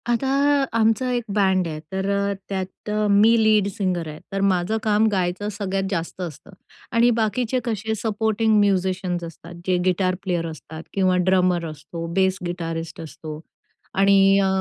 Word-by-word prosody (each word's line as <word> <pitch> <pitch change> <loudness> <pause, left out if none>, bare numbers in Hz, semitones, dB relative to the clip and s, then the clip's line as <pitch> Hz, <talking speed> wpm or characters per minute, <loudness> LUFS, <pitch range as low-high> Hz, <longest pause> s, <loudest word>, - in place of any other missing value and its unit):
आता 240 +3 +1 0.5
आमचं 230 +3 +2
एक 240 -1 -1
बँड 190 -3 +2
आहे, 155 -1 -5
तर 190 +1 -2
अ, 200 0 +1 0.2
त्यात 190 +1 -5
अ, 210 0 +1
मी 210 +3 +5
लीड 215 -2 +4
सिंगर 180 -4 -2
आहे, 150 0 -8
तर 195 0 -2
माझं 190 +2 +1
काम 215 0 +3
गायचं 190 +1 -1
सगळ्यात 195 -1 -1
जास्त 170 0 -3
असतं 175 +2 -7 0.4
आणि 235 +1 +4
बाकीचे 235 +3 0
कसे 220 -1 -2
सपोर्टिंग 220 0 +1
म्युझिशियन्स 185 -3 0
असतात. 170 +1 -10
जे 185 -1 +3
गिटार 185 0 +1
प्लेयर 175 -3 -1
असतात 160 +1 -9
किंवा 185 -2 +2
ड्रमर 180 -2 +3
असतो, 155 +2 -7
बेस 190 0 +2
गिटारिस्ट 165 -2 -4
असतो 155 -1 -8 0.6
आणि 195 0 +5
अ, 195 - +2
190 Hz, 155 wpm, -23 LUFS, 175-210 Hz, 0.6 s, मी